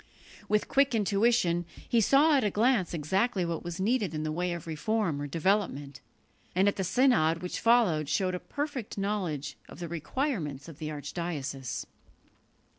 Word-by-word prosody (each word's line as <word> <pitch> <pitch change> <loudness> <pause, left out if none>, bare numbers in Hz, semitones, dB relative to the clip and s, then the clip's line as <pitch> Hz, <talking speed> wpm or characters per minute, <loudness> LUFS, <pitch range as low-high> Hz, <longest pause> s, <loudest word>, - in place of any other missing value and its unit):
With 210 0 +2
quick 275 -2 +3
intuition 200 -4 +2 0.2
he 235 - +3
saw 290 +7 +5
at 270 - +3
a 210 - +2
glance 215 -3 +2
exactly 190 +5 0
what 170 -1 -3
was 175 +1 -5
needed 205 -4 +1
in 155 - -2
the 155 - -2
way 175 +3 -1
of 170 -2 -5
reform 165 0 -1
or 145 - -3
development, 145 -4 -1 0.5
and 190 +2 +4
at 205 - +2
the 190 - -2
synod 185 -6 +3
which 180 - -3
followed 205 - +3
showed 185 -1 +1
a 180 - -2
perfect 285 - -5
knowledge 180 -8 -2
of - - -11
the 175 - -5
requirements 170 - -3
of 165 -2 -11
the 155 - -4
archdiocese. 145 -4 -4
180 Hz, 165 wpm, -29 LUFS, 155-225 Hz, 0.5 s, saw